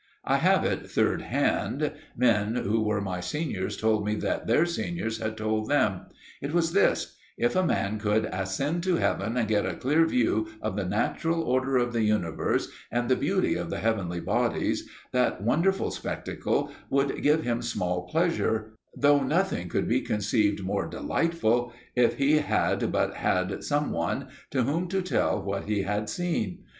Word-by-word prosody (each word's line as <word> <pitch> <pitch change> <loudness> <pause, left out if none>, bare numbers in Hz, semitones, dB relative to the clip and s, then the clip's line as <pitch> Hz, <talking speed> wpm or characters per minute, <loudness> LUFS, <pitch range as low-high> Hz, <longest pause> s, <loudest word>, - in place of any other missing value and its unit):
I - - +3
have - - +3
it - - -2
third - - +1
hand; - - 0 0.3
men 115 -2 +2
who 110 -1 +1
were 105 -2 0
my 95 -2 -3
seniors 100 - -3
told 110 -1 +2
me 105 +1 0
that - - -2
their 135 +9 +4
seniors 170 -9 -3
had 110 -1 -3
told 110 0 -1
them. 105 -10 +1 0.3
It 145 +4 -3
was 165 -1 +2
this: - - +2 0.2
"If 120 - +1
a 185 - +3
man 105 - 0
could 105 +1 +1
ascend 95 - -1
to 185 -2 +3
heaven 115 -6 0
and 115 -3 +1
get 105 -1 +2
a - - -3
clear 155 +5 +3
view 110 -6 +1
of 110 -3 -3
the 100 -2 -1
natural 165 - 0
order 130 -1 +1
of 120 -1 +1
the 115 - +1
universe, 105 -7 0 0.2
and 120 +1 0
the 130 - +5
beauty - - +1
of - - -3
the - - -3
heavenly 100 -6 -1
bodies, - - 0 0.2
that 125 -6 +1
wonderful 170 - +2
spectacle - - -2 0.2
would 140 0 +1
give 155 +2 +3
him 120 0 -1
small 90 -6 -2
pleasure, 110 - 0 0.2
though 145 0 +5
nothing 155 - 0
could - - 0
be - - +2
conceived 105 -1 0
more 100 +1 -1
delightful 120 -8 0 0.2
if 125 -1 +3
he 140 +3 +4
had 150 - 0
but - - +1
had 90 0 0
some 145 0 0
one 85 0 -2 0.2
to 130 -2 +1
whom 160 +8 0
to 190 +1 -1
tell 185 - +1
what 100 0 -3
he 105 -2 0
had 105 +2 -2
seen." 165 - -2
115 Hz, 170 wpm, -27 LUFS, 105-145 Hz, 0.3 s, the